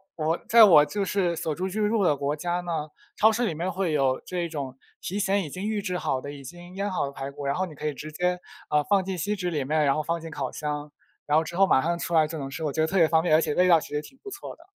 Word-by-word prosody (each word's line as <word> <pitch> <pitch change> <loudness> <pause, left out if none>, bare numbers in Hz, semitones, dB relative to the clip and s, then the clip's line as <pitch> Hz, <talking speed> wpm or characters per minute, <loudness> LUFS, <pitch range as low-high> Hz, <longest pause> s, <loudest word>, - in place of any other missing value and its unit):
我 160 +1 0
在 230 0 +8
我 165 -8 +8
就 205 +5 -2
是 185 -3 0
所 160 -2 -3
住 185 +4 -2
居 210 +2 0
住 215 -1 +1
的 150 -5 +3
国 140 +1 -1
家 175 +3 -2
呢， 160 -3 -3 0.3
超 220 +1 +5
市 240 +3 0
里 190 - -1
面 175 +4 -2
会 180 -3 -1
有 135 -3 +1
这 180 - -4
一 170 -1 -2
种 140 -5 -5 0.2
提 195 +3 -3
前 200 0 +1
已 155 - -6
经 185 +8 -5
预 215 -1 -1
制 185 -3 -2
好 130 -7 -1
的 140 - -7
已 140 -1 -10
经 175 +6 -11
腌 200 +1 -2
好 180 - 0
的 140 - -5
排 140 0 -6
骨， 140 0 -8
然 140 - 0
后 185 - 0
你 170 - -10
可 150 +1 -5
以 150 - -1
直 150 +3 -8
接， 180 +3 -1 0.3
啊， 150 0 +2
放 195 +3 +2
进 190 0 -4
锡 205 +6 -1
纸 180 -3 -2
里 150 -5 -1
面， 155 +2 +1
然 140 - +3
后 155 - -1
放 170 +2 -1
进 165 - -7
烤 140 -5 -4
箱， 150 0 -4 0.3
然 150 - +1
后 160 - +3
之 170 +2 -8
后 195 +2 +5
马 135 -8 +4
上 170 +3 0
出 170 - -4
来 160 -2 +4
就 160 +1 -6
能 135 -2 -5
吃， 160 +4 -6
我 150 - 0
觉 155 - 0
得 160 - +2
特 195 - -1
别 165 -3 +6
方 160 0 +3
便， 175 - +2
而 155 - +6
且 155 -2 -1
味 180 - +4
道 170 -2 +6
其 - - -9
实 150 - 0
挺 265 +12 -15
不 405 - -8
错 395 0 -8
的。 330 - -20
165 Hz, 345 characters per minute, -26 LUFS, 150-185 Hz, 0.3 s, 在